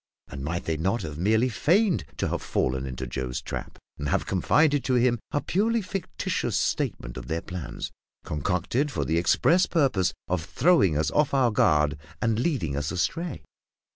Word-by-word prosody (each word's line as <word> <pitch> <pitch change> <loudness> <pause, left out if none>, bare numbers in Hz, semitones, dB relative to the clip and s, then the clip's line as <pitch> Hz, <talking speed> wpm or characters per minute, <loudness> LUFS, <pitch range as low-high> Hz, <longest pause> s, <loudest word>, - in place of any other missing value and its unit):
and 70 0 -7
might 85 +4 -2
they 80 -1 -1
not 95 +7 0
have 75 -1 -6
merely 110 +6 +3
feigned 175 - +2
to - - 0
have - - -2
fallen 65 +1 -1
into 65 0 -5
Joe's 65 0 -3
trap, - - -6 0.2
and 75 - -2
have - - +1
confided 145 - +2
to 130 - +2
him 120 -1 +3
a 145 - -1
purely 225 +5 +1
fictitious 185 -1 -2
statement - - -1
of 60 -1 -7
their 80 +3 -2
plans, 90 -4 -6 0.3
concocted 90 - -1
for - - -2
the 80 +1 +1
express 175 - +3
purpose 135 - +2 0.2
of 90 -2 -1
throwing 110 - +3
us 75 - +1
off 150 -2 +2
our 130 -3 +4
guard 75 -7 +3 0.2
and 115 -1 +1
leading 120 - 0
us 75 +2 -2
astray? 135 - -2
95 Hz, 170 wpm, -26 LUFS, -, 0.3 s, our